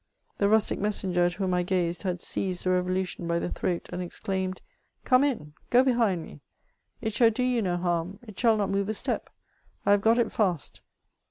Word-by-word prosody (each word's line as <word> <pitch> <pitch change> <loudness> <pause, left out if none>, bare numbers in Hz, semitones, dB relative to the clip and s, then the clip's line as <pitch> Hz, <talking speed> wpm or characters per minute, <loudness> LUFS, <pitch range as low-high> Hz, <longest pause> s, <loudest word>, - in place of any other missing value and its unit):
The 200 - +3
rustic 220 0 +3
messenger 190 -4 +1
at 175 - +1
whom 185 0 -1
I 180 - +2
.gazed 175 -2 -1
had 180 -3 -2
seized 185 -2 -2
the 185 - +1
reToIu 185 +1 +1
tion 175 - -6
by 170 0 +1
the 170 - -2
throat, 175 -2 -2
and 180 - -3
exclaimed, 190 +1 -3 0.4
'^ - - -43
Come 255 +1 +5
in; 215 - -2 0.2
go 250 +1 +6
behind 230 -10 +2
me; - - -12 0.6
it 220 -2 -2
shall 230 0 +5
do 230 +3 -1
you 250 -2 +1
no 180 -3 0
harm; 175 +1 -1
it 215 -4 -11
shall 230 -2 +4
not 205 -2 0
move 200 +1 0
a 215 - +2
step; - - -1 0.6
I - - +4
have 205 0 +5
got 225 +2 +4
it 240 - +2
feist.'' 180 - -1
190 Hz, 210 wpm, -27 LUFS, 180-220 Hz, 0.6 s, go